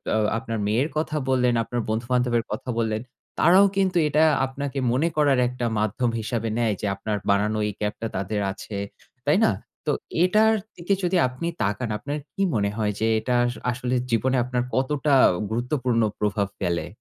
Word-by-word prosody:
আ -, -, +3 dB, 0.2 s
আপনার 115 Hz, -1 st, -4 dB
মেয়ের 125 Hz, +9 st, +1 dB
কথা 155 Hz, 0 st, -1 dB
বললেন, 125 Hz, -2 st, +3 dB
আপনার 120 Hz, +1 st, -3 dB
বন্ধুবান্ধবের 120 Hz, +1 st, +1 dB
কথা 110 Hz, +4 st, -5 dB
বললেন, 110 Hz, -1 st, 0 dB, 0.4 s
তারাও 190 Hz, +3 st, +6 dB
কিন্তু 190 Hz, -2 st, +2 dB
এটা 150 Hz, +2 st, +3 dB, 0.2 s
আপনাকে 135 Hz, +1 st, -4 dB
মনে 135 Hz, +7 st, +2 dB
করার 140 Hz, -4 st, +4 dB
একটা 125 Hz, -1 st, -3 dB
মাধ্যম 110 Hz, +3 st, 0 dB
হিসাবে 115 Hz, 0 st, -2 dB
নেয়। 115 Hz, -3 st, +2 dB
যে -, -, -2 dB
আপনার 105 Hz, +1 st, -3 dB
বানানো 105 Hz, +2 st, +2 dB
এই 105 Hz, -, -3 dB
ক্যাপ 105 Hz, 0 st, -1 dB
টা 115 Hz, -, -1 dB
তাদের 100 Hz, +2 st, -2 dB
আছে। 100 Hz, +1 st, -8 dB, 0.5 s
তাই -, -, +4 dB
না? -, -, +4 dB, 0.3 s
তো -, -, +2 dB, 0.3 s
এটার 215 Hz, +4 st, +4 dB, 0.2 s
দিকে 175 Hz, +3 st, -1 dB
যদি 180 Hz, +1 st, +2 dB
আপনি 130 Hz, +7 st, -5 dB, 0.2 s
তাকান 105 Hz, +4 st, -1 dB
আপনার 145 Hz, +7 st, -4 dB, 0.2 s
কি 195 Hz, -, -4 dB
মনে 100 Hz, -2 st, +1 dB
হয়? 105 Hz, -2 st, 0 dB
যে 110 Hz, -, +1 dB
এটা 125 Hz, +2 st, -1 dB
আ -, -, +2 dB, 0.3 s
আসলে 125 Hz, +1 st, -2 dB, 0.2 s
জীবনে 130 Hz, +3 st, +2 dB
আপনার 125 Hz, 0 st, -1 dB
কতটা 140 Hz, +2 st, +1 dB, 0.4 s
গুরুত্বপূর্ণ 120 Hz, 0 st, 0 dB, 0.2 s
প্রভাব 105 Hz, -1 st, 0 dB
ফেলে? 85 Hz, -3 st, -1 dB
120 Hz, 175 wpm, -24 LUFS, 110-140 Hz, 0.5 s, তারাও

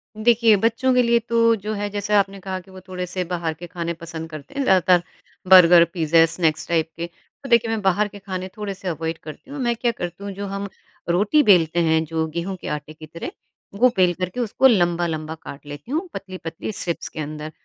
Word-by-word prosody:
देखिए, 225 Hz, 0 st, +4 dB
बच्चों 230 Hz, +5 st, +1 dB
के 250 Hz, -, +5 dB
लिए 235 Hz, 0 st, +3 dB
तो 230 Hz, 0 st, +4 dB
जो 215 Hz, +1 st, -5 dB
है 205 Hz, 0 st, -3 dB
जैसा 205 Hz, 0 st, +1 dB
आपने 195 Hz, 0 st, -2 dB
कहा 190 Hz, 0 st, -4 dB
कि 190 Hz, +1 st, -17 dB
वो 190 Hz, -, -11 dB
थोड़े-से 180 Hz, 0 st, -4 dB
बाहर 170 Hz, -2 st, -3 dB
के 175 Hz, +3 st, -10 dB
खाने 170 Hz, 0 st, -4 dB
पसंद 165 Hz, -1 st, -8 dB
करते 155 Hz, -3 st, -10 dB
हैं, 280 Hz, -, +1 dB
ज़्यादातर 185 Hz, -5 st, +4 dB, 0.5 s
बर्गर, 175 Hz, -2 st, +9 dB
पिज़्ज़ा, 165 Hz, -1 st, +4 dB
स्नैक्स 165 Hz, -1 st, -1 dB
टाइप 165 Hz, -1 st, +1 dB
के। 170 Hz, -, -3 dB, 0.4 s
तो 270 Hz, -, -7 dB
देखिए, 235 Hz, -1 st, +4 dB
मैं 225 Hz, -1 st, -1 dB
बाहर 195 Hz, +2 st, +2 dB
के 205 Hz, 0 st, -12 dB
खाने 185 Hz, -2 st, -5 dB
थोड़े-से 195 Hz, -3 st, -5 dB
अवॉइड 165 Hz, -1 st, -3 dB
करती 155 Hz, -, -11 dB
हूँ, 285 Hz, -, -6 dB
मैं 240 Hz, -2 st, 0 dB
क्या 235 Hz, +1 st, 0 dB
करती 175 Hz, -2 st, -6 dB
हूँ 200 Hz, -, -4 dB
जो 200 Hz, +1 st, -5 dB
हम 200 Hz, +1 st, -4 dB, 0.4 s
रोटी 205 Hz, -, +3 dB
बेलते 175 Hz, -, +4 dB
हैं, 160 Hz, -1 st, +3 dB
जो 160 Hz, 0 st, -1 dB
गेहूँ 170 Hz, +4 st, -4 dB
के -, -, -7 dB
आटे 150 Hz, +1 st, -5 dB
की 155 Hz, 0 st, -12 dB
तरह, 165 Hz, +2 st, -7 dB, 0.4 s
वो 250 Hz, +5 st, +5 dB
बेल 180 Hz, -2 st, +4 dB
करके 185 Hz, +5 st, -4 dB
उसको 245 Hz, +3 st, +3 dB
लंबा-लंबा 170 Hz, -6 st, +1 dB
काट 150 Hz, -2 st, -11 dB
लेती 145 Hz, -, -9 dB
हूँ, 330 Hz, +6 st, -1 dB
पतली-पतली 185 Hz, -2 st, -6 dB
स्ट्रिप्स 175 Hz, -4 st, -4 dB
के -, -, -9 dB
अंदर, 155 Hz, +1 st, -5 dB
185 Hz, 210 wpm, -22 LUFS, 165-210 Hz, 0.5 s, बर्गर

